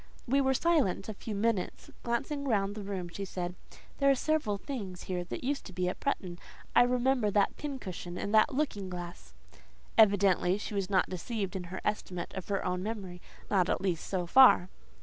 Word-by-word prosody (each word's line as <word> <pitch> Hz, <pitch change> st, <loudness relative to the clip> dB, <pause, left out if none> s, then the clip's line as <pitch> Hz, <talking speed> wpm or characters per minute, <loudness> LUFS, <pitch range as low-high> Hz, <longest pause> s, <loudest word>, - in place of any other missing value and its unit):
We 275 Hz, +3 st, +3 dB
were 265 Hz, 0 st, +2 dB
silent 285 Hz, -, +1 dB
a -, -, -3 dB
few 210 Hz, +1 st, -6 dB
minutes. 210 Hz, -2 st, -1 dB
Glancing 280 Hz, +4 st, -2 dB
round 200 Hz, -4 st, +1 dB
the 210 Hz, -, -6 dB
room 195 Hz, -3 st, -4 dB
she 185 Hz, +3 st, -6 dB
said, 180 Hz, -2 st, -4 dB, 0.5 s
"There 275 Hz, -1 st, +4 dB
are 275 Hz, -, +5 dB
several 280 Hz, -7 st, 0 dB
things 200 Hz, -6 st, -6 dB
here 180 Hz, -1 st, -3 dB
that 175 Hz, -, -6 dB
used 280 Hz, +2 st, -1 dB
to 190 Hz, -, -11 dB
be 180 Hz, 0 st, -1 dB
at 180 Hz, -, -3 dB
Bretton! 180 Hz, -10 st, -2 dB, 0.4 s
I -, -, +8 dB
remember 250 Hz, -2 st, +2 dB
that 205 Hz, -1 st, +2 dB
pincushion 190 Hz, -, -6 dB
and 205 Hz, -, -3 dB
that 215 Hz, -, +5 dB
looking 255 Hz, -9 st, -2 dB
glass." 175 Hz, -, -8 dB, 0.6 s
Evidently 195 Hz, -3 st, +5 dB
she 210 Hz, -, -6 dB
was 195 Hz, -2 st, -1 dB
not 190 Hz, -2 st, +3 dB
deceived 195 Hz, +2 st, -3 dB
in 185 Hz, -2 st, -4 dB
her 185 Hz, +2 st, -6 dB
estimate 180 Hz, -4 st, -3 dB
of 190 Hz, -, -6 dB
her 200 Hz, -1 st, -1 dB
own 180 Hz, 0 st, -1 dB
memory; 190 Hz, -4 st, -5 dB, 0.3 s
not, 185 Hz, -3 st, +3 dB
at -, -, +1 dB
least, 180 Hz, -4 st, -2 dB
so 185 Hz, -2 st, -1 dB
far. 220 Hz, -3 st, +7 dB
200 Hz, 190 wpm, -31 LUFS, 180-240 Hz, 0.6 s, I